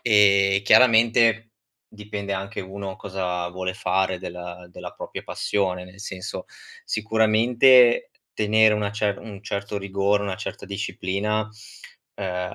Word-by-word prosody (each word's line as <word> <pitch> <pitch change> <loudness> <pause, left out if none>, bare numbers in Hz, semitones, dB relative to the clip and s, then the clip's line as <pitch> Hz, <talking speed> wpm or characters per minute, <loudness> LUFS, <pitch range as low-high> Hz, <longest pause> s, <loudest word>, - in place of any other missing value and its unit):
e, 100 -3 +4
chiaramente, 115 -1 +4 0.4
dipende 105 -1 -6
anche 95 +1 -4
uno 95 0 -7
cosa 90 -3 -3
vuole 95 +1 -4
fare 95 0 0
della 90 0 -8
della - - -9
propria - - -8
passione, 90 -3 -2
nel 90 +2 -15
senso 95 -3 -7 0.4
sicuramente 115 +3 +4 0.2
tenere 110 0 +3
una 105 -1 -1
cer 105 -1 -1
un 105 -2 -10
certo 100 0 -4
rigore, 100 +1 0
una 100 -2 -3
certa 105 - -7
disciplina, 100 +1 -2 0.7
uhm, 90 -2 -4
100 Hz, 120 wpm, -23 LUFS, 95-110 Hz, 0.7 s, e